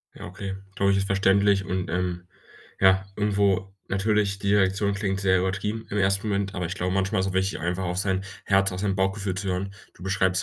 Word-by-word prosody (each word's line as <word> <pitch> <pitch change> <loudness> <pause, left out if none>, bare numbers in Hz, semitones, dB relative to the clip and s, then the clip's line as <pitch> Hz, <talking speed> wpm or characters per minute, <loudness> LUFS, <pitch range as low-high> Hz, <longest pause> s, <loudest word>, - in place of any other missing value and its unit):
Ja, - - -9
okay, 95 +2 -6 0.2
glaube 100 0 +2
ich, 100 - +3
ist 95 - -1
verständlich 100 0 +3
und, 90 -2 -2
ähm, 90 0 -2 0.5
ja, 95 0 +5
irgendwo, 100 -2 +1 0.2
natürlich, 100 0 +1
die 100 0 +1
Reaktion 100 +1 +2
klingt 100 -1 -1
sehr 95 -2 +3
übertrieben 100 +4 -2
im 105 - -2
1. 100 +1 +1
Moment, 100 -1 -1
aber 90 - -2
ich 90 - -3
glaube, 90 -1 -1
manchmal 95 +2 +1
ist's 95 - 0
auch - - -9
wichtig, 95 +1 0
einfach 90 +3 -2
auf 90 -1 -2
sein 95 0 0 0.2
Herz, 100 0 +3
auf 90 - -5
sein 100 -1 0
Bauchgefühl 95 0 0
zu 95 +1 -4
hören. 95 +2 -2 0.2
Du - - -13
beschreibst 95 -1 +1
95 Hz, 215 wpm, -25 LUFS, 95-100 Hz, 0.5 s, ja